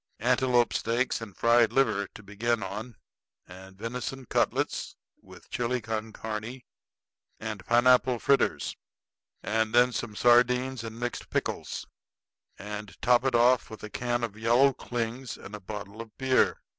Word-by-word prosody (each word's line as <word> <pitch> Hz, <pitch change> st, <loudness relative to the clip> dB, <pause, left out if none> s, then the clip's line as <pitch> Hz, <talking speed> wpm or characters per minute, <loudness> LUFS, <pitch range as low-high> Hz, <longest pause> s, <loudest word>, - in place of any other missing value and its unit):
Antelope 125 Hz, 0 st, +2 dB
steaks 120 Hz, +2 st, 0 dB
and 100 Hz, -4 st, -9 dB
fried 115 Hz, -1 st, +4 dB
liver 110 Hz, -6 st, +2 dB
to 105 Hz, -, -11 dB
begin 110 Hz, +3 st, -1 dB
on, 110 Hz, +4 st, -6 dB, 0.5 s
and 95 Hz, +1 st, -13 dB
venison 125 Hz, +4 st, -5 dB
cutlets -, -, -1 dB, 0.3 s
with -, -, -15 dB
chili 125 Hz, +1 st, -1 dB
con 110 Hz, -1 st, -4 dB
carne 110 Hz, +4 st, -6 dB, 0.8 s
and 105 Hz, -3 st, -5 dB
pineapple 125 Hz, +1 st, +4 dB
fritters, 140 Hz, +4 st, +1 dB, 0.7 s
and 110 Hz, +1 st, 0 dB
then 125 Hz, +1 st, +6 dB
some 115 Hz, -2 st, -4 dB
sardines 125 Hz, +1 st, +3 dB
and 115 Hz, 0 st, -7 dB
mixed 120 Hz, 0 st, -4 dB
pickles; -, -, -3 dB, 0.7 s
and 105 Hz, +1 st, -7 dB
top 120 Hz, 0 st, +4 dB
it 135 Hz, -2 st, +1 dB
off 120 Hz, +1 st, +4 dB
with 110 Hz, -1 st, -10 dB
a 105 Hz, -, -7 dB
can 120 Hz, -1 st, -1 dB
of 110 Hz, -3 st, -3 dB
yellow 120 Hz, +5 st, +4 dB
clings 120 Hz, +1 st, -4 dB
and 100 Hz, -, -11 dB
a 105 Hz, -, -5 dB
bottle 105 Hz, +2 st, -7 dB
of 115 Hz, -2 st, -12 dB
beer. 130 Hz, -1 st, +2 dB
115 Hz, 145 wpm, -28 LUFS, 110-125 Hz, 0.8 s, then